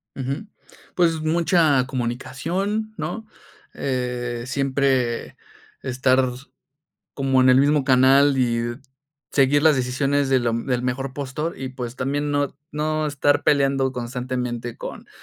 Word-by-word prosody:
Ujú, 135 Hz, +9 st, -4 dB, 0.5 s
pues, 165 Hz, -3 st, +2 dB
mucha 160 Hz, -4 st, +3 dB
comunicación, 165 Hz, -, -3 dB
¿no? 220 Hz, -1 st, -5 dB, 0.5 s
Eh, 125 Hz, -2 st, -3 dB
siempre 135 Hz, -3 st, 0 dB, 0.5 s
estar 130 Hz, 0 st, +2 dB, 0.8 s
como 135 Hz, -2 st, +2 dB
en 130 Hz, -, +5 dB
el 125 Hz, -, +6 dB
mismo 145 Hz, 0 st, +3 dB
canal 135 Hz, +2 st, +5 dB
y 120 Hz, -1 st, 0 dB, 0.6 s
seguir 140 Hz, +1 st, +3 dB
las 155 Hz, -2 st, +6 dB
decisiones 135 Hz, +2 st, 0 dB
de 130 Hz, -, +4 dB
lo 120 Hz, -1 st, 0 dB
del 125 Hz, +1 st, -1 dB
mejor 130 Hz, +1 st, -3 dB
postor 145 Hz, +5 st, -4 dB
y, 135 Hz, -, -3 dB
pues, 125 Hz, -1 st, -7 dB
también 145 Hz, +3 st, -1 dB
no 145 Hz, -1 st, -1 dB, 0.2 s
no 155 Hz, +1 st, -1 dB
estar 145 Hz, 0 st, +1 dB
peleando 135 Hz, -2 st, +2 dB
constantemente 125 Hz, -1 st, -4 dB
con -, -, -8 dB
135 Hz, 120 wpm, -22 LUFS, 125-145 Hz, 0.8 s, el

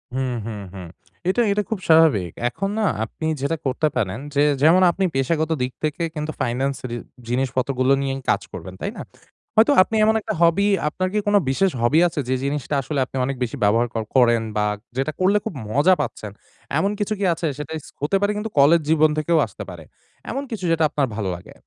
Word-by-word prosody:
হুম, 130 Hz, -1 st, -1 dB
হুম 110 Hz, -2 st, -5 dB
হুম। 90 Hz, -3 st, -8 dB, 0.4 s
এটা, 240 Hz, +6 st, +2 dB
এটা 210 Hz, +1 st, +1 dB
খুব 220 Hz, -4 st, -2 dB
স্বাভাবিক। 150 Hz, -, +5 dB, 0.2 s
এখন 195 Hz, +9 st, -3 dB
না -, -, +1 dB, 0.2 s
আপনি 110 Hz, +8 st, -6 dB, 0.2 s
যেটা 150 Hz, +4 st, -1 dB
করতে 135 Hz, +4 st, +1 dB
পারেন 105 Hz, -5 st, -1 dB, 0.2 s
যে 145 Hz, -, +3 dB, 0.2 s
যেমন 170 Hz, +5 st, +6 dB
আপনি 190 Hz, +2 st, -1 dB
পেশাগত 155 Hz, +4 st, 0 dB
দিক 125 Hz, -, -1 dB
থেকে 155 Hz, +2 st, -1 dB
কিন্তু 150 Hz, 0 st, -3 dB
ফাইনান্স 130 Hz, +3 st, 0 dB
রি 120 Hz, -, -4 dB, 0.3 s
জিনিসপত্রগুলো 130 Hz, +1 st, +1 dB
নিয়েই 135 Hz, -1 st, -2 dB
কাজ -, -, +2 dB
করবেন, -, -, -8 dB
তাই -, -, -2 dB
না? -, -, -5 dB, 0.5 s
হয়তো 225 Hz, +6 st, +5 dB
আপনি 220 Hz, -, 0 dB
এমন 220 Hz, -, +3 dB
একটা 215 Hz, -, -3 dB
hobby 170 Hz, +4 st, +4 dB, 0.2 s
আপনার 185 Hz, +4 st, -2 dB
কি 210 Hz, -, 0 dB
কোনো 205 Hz, 0 st, +5 dB
বিশেষ 190 Hz, +9 st, +2 dB
hobby 140 Hz, +7 st, +4 dB
আছে 160 Hz, -, -5 dB
যে 130 Hz, -, +2 dB
জিনিসটা 145 Hz, +1 st, -2 dB
আসলে 140 Hz, +1 st, -3 dB, 0.3 s
অনেক 135 Hz, 0 st, -3 dB
বেশি 125 Hz, +4 st, -4 dB
ব্যবহার 115 Hz, +4 st, +3 dB
কর 115 Hz, -, -2 dB
করেন 120 Hz, -3 st, +5 dB, 0.2 s
বা 105 Hz, -, +2 dB, 0.3 s
যেটা 135 Hz, +3 st, 0 dB
করলে 195 Hz, +3 st, +3 dB
খুব -, -, -3 dB, 0.2 s
মজা 150 Hz, +10 st, +4 dB
পাচ্ছেন 105 Hz, -2 st, -5 dB, 0.5 s
এমন 200 Hz, +1 st, +1 dB
কিছু 205 Hz, +1 st, -1 dB
কি 200 Hz, -, 0 dB
আছে? 165 Hz, 0 st, -3 dB
সেটা 150 Hz, +1 st, -7 dB
ইছ -, -, -15 dB
হতে 145 Hz, +7 st, 0 dB
পারে 205 Hz, +1 st, +2 dB
কিন্তু 220 Hz, +1 st, -3 dB
কলেজ 155 Hz, +4 st, +6 dB
জীবন 155 Hz, -1 st, +4 dB
থেকেও 160 Hz, +2 st, +2 dB
আসতে -, -, -9 dB
পারে। -, -, -9 dB, 0.5 s
এমন 275 Hz, -, -3 dB
কিছু 210 Hz, -5 st, -4 dB
যেটা 165 Hz, -1 st, +2 dB
আপনার 145 Hz, -2 st, 0 dB
ভালো 100 Hz, -4 st, -2 dB
লাগে। 90 Hz, -, -12 dB
150 Hz, 200 wpm, -22 LUFS, 130-180 Hz, 0.5 s, যেমন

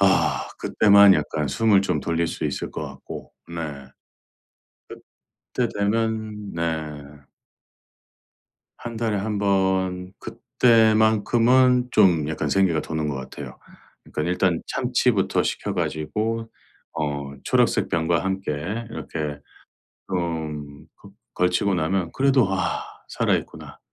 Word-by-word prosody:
아. 95 Hz, 0 st, +2 dB
그때만 100 Hz, -2 st, +6 dB
약간 75 Hz, 0 st, -1 dB
숨을 105 Hz, +7 st, +3 dB
좀 100 Hz, -, 0 dB
돌릴 85 Hz, 0 st, 0 dB
수 -, -, -4 dB
있을 -, -, -3 dB
것 -, -, -5 dB
같고 -, -, -10 dB, 0.2 s
네. 80 Hz, -5 st, -6 dB, 1.7 s
그때 125 Hz, -2 st, +1 dB
되면 110 Hz, -1 st, -1 dB
네. 85 Hz, 0 st, -1 dB, 2.1 s
1 115 Hz, -1 st, -7 dB
달에 110 Hz, -2 st, 0 dB
1 105 Hz, +1 st, -2 dB
번 95 Hz, -2 st, 0 dB
그때만큼은 115 Hz, +2 st, +3 dB
좀 90 Hz, -8 st, +4 dB
약간 75 Hz, -2 st, -2 dB
생기가 90 Hz, -3 st, +2 dB
도는 80 Hz, -1 st, -3 dB
것 70 Hz, -, -2 dB
같아요. 65 Hz, 0 st, -8 dB, 0.5 s
그러니까 75 Hz, -, -4 dB
일단 90 Hz, -2 st, +1 dB
참치부터 125 Hz, -6 st, +1 dB
시켜 -, -, -2 dB
가지고 110 Hz, +8 st, -2 dB, 0.4 s
어 70 Hz, -2 st, -3 dB
초록색 -, -, +2 dB
병과 85 Hz, +1 st, +1 dB
함께 95 Hz, -3 st, -2 dB, 0.4 s
이렇게 75 Hz, -9 st, -5 dB, 0.7 s
좀 80 Hz, -5 st, -4 dB
그 -, -, -14 dB, 0.2 s
걸치고 90 Hz, +2 st, +1 dB
나면 85 Hz, +1 st, -1 dB
그래도 135 Hz, -3 st, +3 dB
'아 95 Hz, -, -1 dB, 0.3 s
살아있구나. -, -, -2 dB
95 Hz, 215 characters per minute, -23 LUFS, 80-110 Hz, 2.1 s, 그때만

